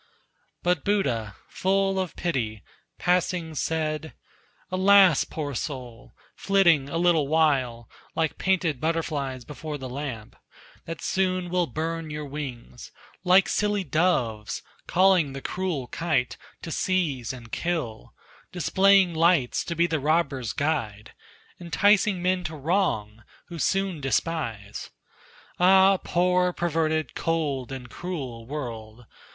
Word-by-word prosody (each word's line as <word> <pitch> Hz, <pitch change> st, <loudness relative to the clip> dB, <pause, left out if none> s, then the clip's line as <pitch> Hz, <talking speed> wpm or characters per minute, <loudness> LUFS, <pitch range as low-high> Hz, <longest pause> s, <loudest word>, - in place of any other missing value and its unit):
But 175 Hz, -3 st, +1 dB
Buddha, 120 Hz, -, 0 dB
full 195 Hz, 0 st, +1 dB
of 185 Hz, -3 st, -3 dB
pity, 115 Hz, -, -2 dB, 0.3 s
passing 180 Hz, -2 st, 0 dB
said: 155 Hz, 0 st, -2 dB, 0.6 s
"Alas, 190 Hz, -3 st, +6 dB
poor 145 Hz, -3 st, -5 dB
soul! 125 Hz, -3 st, -6 dB, 0.2 s
flitting 170 Hz, -8 st, +3 dB
a 165 Hz, -, -2 dB
little 170 Hz, -4 st, +3 dB
while 135 Hz, -7 st, +1 dB, 0.3 s
Like 160 Hz, -2 st, -1 dB
painted 175 Hz, -8 st, +1 dB
butterflies 145 Hz, -6 st, -2 dB
before 150 Hz, 0 st, -6 dB
the 130 Hz, -2 st, -7 dB
lamp 125 Hz, -5 st, -6 dB, 0.5 s
That 165 Hz, -1 st, -7 dB
soon 185 Hz, -2 st, 0 dB
will 180 Hz, -2 st, +1 dB
burn 160 Hz, +4 st, -3 dB
your 150 Hz, 0 st, -5 dB
wings; 135 Hz, -4 st, -7 dB, 0.3 s
like 185 Hz, +1 st, +5 dB
silly 210 Hz, -1 st, 0 dB
doves, 130 Hz, -10 st, 0 dB, 0.2 s
Calling 180 Hz, -6 st, +3 dB
the 135 Hz, -, -5 dB
cruel 180 Hz, -7 st, -3 dB
kite 155 Hz, -7 st, -1 dB, 0.3 s
to 165 Hz, -, -5 dB
seize 150 Hz, -, 0 dB
and 120 Hz, -3 st, -10 dB
kill; 155 Hz, -11 st, -3 dB, 0.4 s
Displaying 190 Hz, +1 st, +4 dB
lights 165 Hz, -5 st, +2 dB
to 170 Hz, -, -3 dB
be 170 Hz, +2 st, +3 dB
the 160 Hz, -2 st, -1 dB
robber's 140 Hz, -5 st, 0 dB
guide; 115 Hz, -9 st, -2 dB, 0.5 s
Enticing 190 Hz, +2 st, +2 dB
men 185 Hz, 0 st, +1 dB
to 155 Hz, -, -4 dB
wrong, 135 Hz, -, -1 dB, 0.3 s
who 170 Hz, -1 st, -7 dB
soon 190 Hz, +1 st, 0 dB
despise. 130 Hz, -6 st, -2 dB, 0.7 s
Ah! 190 Hz, +2 st, +6 dB
poor, 180 Hz, +1 st, +2 dB
perverted, 160 Hz, -2 st, 0 dB
cold 145 Hz, -6 st, -1 dB
and 130 Hz, -2 st, -6 dB
cruel 130 Hz, -11 st, -6 dB
world! 120 Hz, -5 st, -7 dB
160 Hz, 120 wpm, -26 LUFS, 130-180 Hz, 0.7 s, Alas